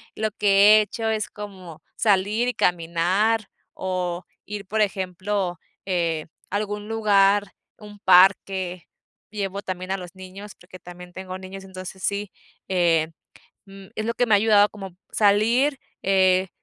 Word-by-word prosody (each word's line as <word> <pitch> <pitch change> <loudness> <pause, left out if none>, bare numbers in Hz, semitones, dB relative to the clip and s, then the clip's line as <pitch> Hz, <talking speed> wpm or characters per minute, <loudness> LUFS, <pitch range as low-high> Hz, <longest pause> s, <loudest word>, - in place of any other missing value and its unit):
lo 215 0 -1
que 205 +1 +6
he - - +4
hecho 225 +2 -4
es 215 -1 -1
como 185 -6 -10
salir 210 +3 +2
y 250 - 0
caminar, 180 +6 +1 0.2
o 180 -1 -3 0.2
ir, 210 -1 -6
por 215 +3 -1
ejemplo, 190 -2 -2 0.3
eh, 170 -4 -1 0.2
a 200 - -4
algún 210 0 -3
lugar, 205 -2 +3 0.2
un 210 -1 -13
parque, 185 -1 +3 0.4
llevo 200 -2 -4
también 185 0 -5
a 195 - 0
los 180 0 -10
niños, 190 +2 -10
porque 185 0 -14
también 180 0 -12
tengo 185 0 -7
niños. 190 +1 -9
Entonces 185 0 -9
sí, 200 0 -2 0.4
eh, 170 -4 +2 0.6
mm, 195 -1 -13
es 215 - -2
lo 235 - -1
que 245 - +2
me 220 - +4
ha - - +6
ayudado 210 -1 +5
como 195 -4 -9
salir, 230 +7 +3 0.2
eh, 190 -1 +3
195 Hz, 150 wpm, -23 LUFS, 185-210 Hz, 0.6 s, que